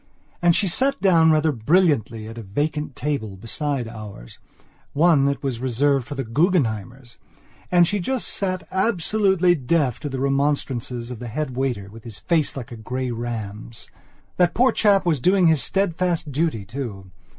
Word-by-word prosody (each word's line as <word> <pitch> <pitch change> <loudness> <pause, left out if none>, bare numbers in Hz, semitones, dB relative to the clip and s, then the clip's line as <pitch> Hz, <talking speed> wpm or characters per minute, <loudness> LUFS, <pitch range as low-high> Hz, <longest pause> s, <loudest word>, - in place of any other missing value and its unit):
And 175 -1 +4
she 200 - +2
sat 270 +10 +1
down 170 -4 +5
rather 155 0 +3
brilliantly 125 - +1
at 115 +1 -8
a - - -6
vacant 145 +7 -3
table, 130 -8 -3
beside 135 - -3
oursone 115 - -2
that 140 +1 -2
was 130 -4 -2
reserved 130 +1 +1
for 145 - -6
the 135 - -2
Guggenheimers. 120 - -1 0.5
And 175 -1 +6
she 205 +4 -1
just 255 +7 -2
sat 185 -2 -2
absolutely 190 -2 +2
deaf 140 -3 0
to 145 - -5
the 135 -1 -4
remonstrances 135 -3 -1
of 120 - -7
the 120 - -6
head 130 +2 -4
waiter 125 -7 -2
with 110 +2 -13
his 115 -4 -8
face 150 - 0
like 125 -1 -7
a 120 - -7
grey 125 +3 -4
ram's. 115 -2 -6 0.5
That 175 -1 +2
poor 255 +2 +4
chap 200 -3 +3
was 160 -5 +1
doing 185 +2 +4
his 160 -4 +4
steadfast 175 - 0
duty 140 -8 -1
too. 110 -7 -7
140 Hz, 160 wpm, -22 LUFS, 115-170 Hz, 0.5 s, And